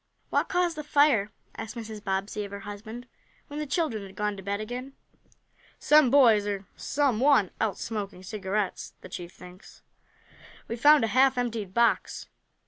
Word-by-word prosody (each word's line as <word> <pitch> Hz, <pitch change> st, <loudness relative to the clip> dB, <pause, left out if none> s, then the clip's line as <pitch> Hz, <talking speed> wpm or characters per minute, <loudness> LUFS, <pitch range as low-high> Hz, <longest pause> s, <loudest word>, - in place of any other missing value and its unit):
"What -, -, +1 dB
caused 355 Hz, -2 st, 0 dB
the 305 Hz, -, -4 dB
fire?" 285 Hz, -9 st, +3 dB, 0.2 s
asked 225 Hz, +2 st, -7 dB
Mrs. 220 Hz, -2 st, -7 dB
Bobbsey 195 Hz, +2 st, -2 dB
of 200 Hz, -, -7 dB
her 200 Hz, 0 st, -8 dB
husband, 220 Hz, +4 st, -8 dB, 0.4 s
when 290 Hz, +1 st, -6 dB
the 300 Hz, -, -3 dB
children 270 Hz, -, -1 dB
had 195 Hz, -1 st, -12 dB
gone 210 Hz, +1 st, -1 dB
to 195 Hz, -, -9 dB
bed 200 Hz, +1 st, -3 dB
again. 250 Hz, +5 st, -6 dB, 0.8 s
"Some 300 Hz, -3 st, +5 dB
boys 230 Hz, -6 st, +5 dB
or 200 Hz, -1 st, -3 dB
some 275 Hz, -6 st, 0 dB
one 265 Hz, -8 st, +4 dB
else 215 Hz, -4 st, -1 dB
smoking 205 Hz, -4 st, -5 dB
cigarettes, 200 Hz, 0 st, -3 dB
the -, -, -11 dB
chief 175 Hz, -1 st, -7 dB
thinks. 180 Hz, +1 st, -15 dB, 0.8 s
We 230 Hz, -, -3 dB
found 290 Hz, +3 st, +6 dB
a -, -, +2 dB
half 265 Hz, +1 st, +4 dB
emptied 230 Hz, -6 st, -3 dB
box." 235 Hz, 0 st, +1 dB
220 Hz, 165 wpm, -27 LUFS, 200-265 Hz, 0.8 s, found